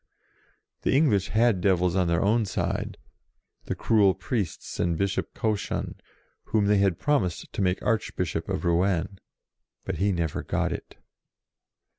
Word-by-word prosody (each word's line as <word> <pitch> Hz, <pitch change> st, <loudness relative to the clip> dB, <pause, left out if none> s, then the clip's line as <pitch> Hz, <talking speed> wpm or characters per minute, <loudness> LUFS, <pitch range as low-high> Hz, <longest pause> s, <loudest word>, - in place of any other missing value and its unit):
The -, -, +1 dB
English 105 Hz, -, +3 dB
had 110 Hz, -4 st, +2 dB
devils 90 Hz, -2 st, +2 dB
on 90 Hz, -2 st, +2 dB
their 85 Hz, 0 st, +1 dB
own 110 Hz, +3 st, +3 dB
side, 95 Hz, -, -2 dB, 0.7 s
the -, -, -3 dB
cruel 100 Hz, -4 st, +3 dB
priests 105 Hz, -9 st, -4 dB
and 85 Hz, -2 st, +1 dB
Bishop 100 Hz, +1 st, -2 dB
Cauchon, 110 Hz, -2 st, -2 dB, 0.5 s
whom 105 Hz, -2 st, +1 dB
they 105 Hz, 0 st, +3 dB
had 95 Hz, -4 st, +2 dB
promised 110 Hz, -, -1 dB
to -, -, -2 dB
make 90 Hz, -1 st, 0 dB
Arch 110 Hz, -1 st, 0 dB
bishop 85 Hz, -1 st, -2 dB
of 95 Hz, -1 st, -2 dB
Rouen. 90 Hz, +2 st, +1 dB, 0.7 s
But -, -, -3 dB
he 100 Hz, +2 st, +2 dB
never 85 Hz, -4 st, -1 dB
got -, -, -1 dB
it. -, -, -9 dB
95 Hz, 145 wpm, -26 LUFS, 90-105 Hz, 0.7 s, English